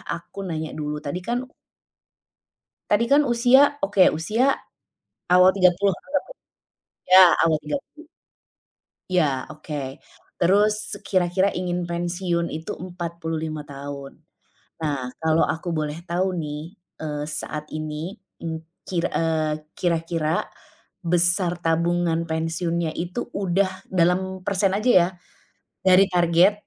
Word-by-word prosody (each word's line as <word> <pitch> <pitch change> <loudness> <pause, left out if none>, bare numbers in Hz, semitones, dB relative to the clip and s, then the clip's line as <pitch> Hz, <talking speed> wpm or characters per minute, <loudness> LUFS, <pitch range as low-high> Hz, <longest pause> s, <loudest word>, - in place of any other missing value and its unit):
Aku 170 +4 -6
nanya 160 -2 -3
dulu. 150 -1 -3
Tadi 160 +6 -4
kan 245 +3 -2 1.4
Tadi 210 +3 +3
kan 285 +1 +7
usia, 245 +1 +5 0.2
oke, 205 -9 +2 0.2
usia 220 +10 +1 0.9
awal 180 +1 +8
30 190 +1 +4
anggaplah, 295 - -4 0.8
ya 185 +1 +10 0.2
awal 160 -1 +3
30. 285 - -6 1.0
Iya 145 -8 +1
oke, 145 -3 -6 0.4
terus 205 +3 +2
kira-kira 185 +1 +2
ingin 180 -1 -2
pensiun 175 0 -1
itu 160 +1 -5
45 165 -3 -5
tahun, 140 -1 -8 0.7
nah 140 -5 -1 0.2
kalau 160 0 +3
aku 170 +2 -3
boleh 155 -2 -2
tahu 180 +2 -1
nih, 150 +5 -6 0.2
eee, 150 -2 -3 0.2
saat 150 0 -6
ini, 155 +6 -5 0.2
mmm, 160 -1 -3 0.2
kir 175 -2 -1
eee, 155 -2 -1 0.2
kira-kira, 165 -2 0 0.6
besar 175 +1 +2
tabungan 170 0 +1
pensiunnya 165 0 -1
itu 180 +7 -4 0.2
udah 190 +1 +2 0.2
dalam 185 +1 +1
persen 195 0 +2
aja 235 +4 +2
ya, 170 - +1 0.8
dari 190 +1 +6
target, 175 +1 +4
170 Hz, 110 wpm, -23 LUFS, 160-185 Hz, 1.4 s, ya